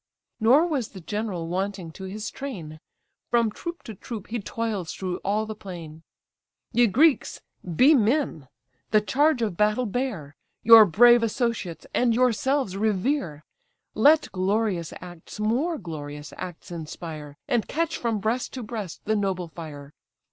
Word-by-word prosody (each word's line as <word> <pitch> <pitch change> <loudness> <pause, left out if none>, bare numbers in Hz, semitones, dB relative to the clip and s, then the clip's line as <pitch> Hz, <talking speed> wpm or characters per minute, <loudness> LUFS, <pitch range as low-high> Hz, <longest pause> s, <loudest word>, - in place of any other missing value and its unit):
Nor 255 +9 +5
was 285 -10 -1
the 195 - -11
general 195 -2 -3
wanting 185 -1 -3
to 190 +4 -9
his 210 +3 -5
train; 175 - -7 0.5
From 235 -2 +2
troop 340 +9 -7
to 220 - -8
troop 210 +1 -8
he 235 +1 -2
toils 210 -4 -3
through 185 -2 -3
all 210 +2 -1
the 215 - -5
plain, 170 -6 -9 0.7
"Ye 240 0 +4
Greeks, 280 - +3 0.4
be 275 - +7
men! 230 - +1 0.4
the 215 - +5
charge 265 +4 +2
of 205 -6 -1
battle 210 +6 +2
bear; 210 - -3 0.3
Your 225 -1 +10
brave 240 +6 +6
associates 230 - -2
and 240 -2 +2
yourselves 255 -2 +1
revere! 200 - -1 0.5
Let 300 +7 +4
glorious 190 -2 0
acts 175 +2 -11
more 255 +11 0
glorious 150 -4 -7
acts 175 0 -8
inspire, 155 -3 -7
And 235 -3 0
catch 330 +1 -1
from 230 -2 -1
breast 220 +5 -2
to 255 - -5
breast 210 -6 -6
the 220 - +1
noble 190 -4 -1
fire! 150 -3 -9
210 Hz, 145 wpm, -25 LUFS, 175-240 Hz, 0.7 s, Your